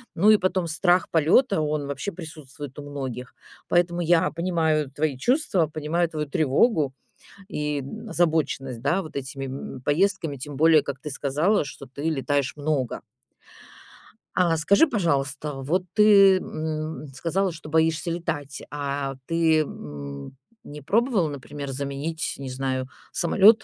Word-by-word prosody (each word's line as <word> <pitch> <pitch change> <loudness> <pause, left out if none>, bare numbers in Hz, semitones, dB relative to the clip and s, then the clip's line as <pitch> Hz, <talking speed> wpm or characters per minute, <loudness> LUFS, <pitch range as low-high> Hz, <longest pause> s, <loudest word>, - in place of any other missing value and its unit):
Ну, 200 +6 +4
и 215 - +7
потом 185 -2 0
страх 175 +3 +2
полёта- 165 - +4
он 150 -2 -1
вообще 140 +8 -4
присутствует 150 -5 -9
у 145 0 -8
многих. 130 -3 -6 0.3
Поэтому 175 0 +2
я 170 0 +3
понимаю 160 -4 0
твои 145 -1 -1
чувства, 240 - +2
понимаю 160 +3 -1
твою 150 -2 -3
тревогу 150 - +2 0.6
и 150 -6 -2 0.3
озабоченность, 155 - 0
да, 165 +8 +1
вот 155 -3 -10
этими, 135 0 -4
м, 130 -1 -7
поездками, 160 0 +1
тем 140 +1 -7
более, 160 0 +6
как 140 -1 -5
ты 150 - -6
сказала, 150 +7 +1
что 135 0 -9
ты 140 +3 -9
летаешь 145 -3 0
много. 145 -4 -1 1.4
А 170 -3 +3
скажи, 200 - +4
пожалуйста, 150 - -1
вот 175 +7 0
ты, 200 -3 +7
м, 155 -2 -4
сказала, 175 +7 0
что 155 -2 -10
боишься 160 +2 +1
летать, 155 -5 -4
а 140 -1 -3
ты, 165 -1 +3
м, 70 - -7 0.3
не 150 0 -9
пробовала, 215 - +2
например, 140 0 -6
заменить, 140 +4 -3
не 135 -1 -6
знаю, 130 0 -2 0.2
самолет, 215 +5 +5
155 Hz, 135 wpm, -25 LUFS, 140-170 Hz, 1.4 s, и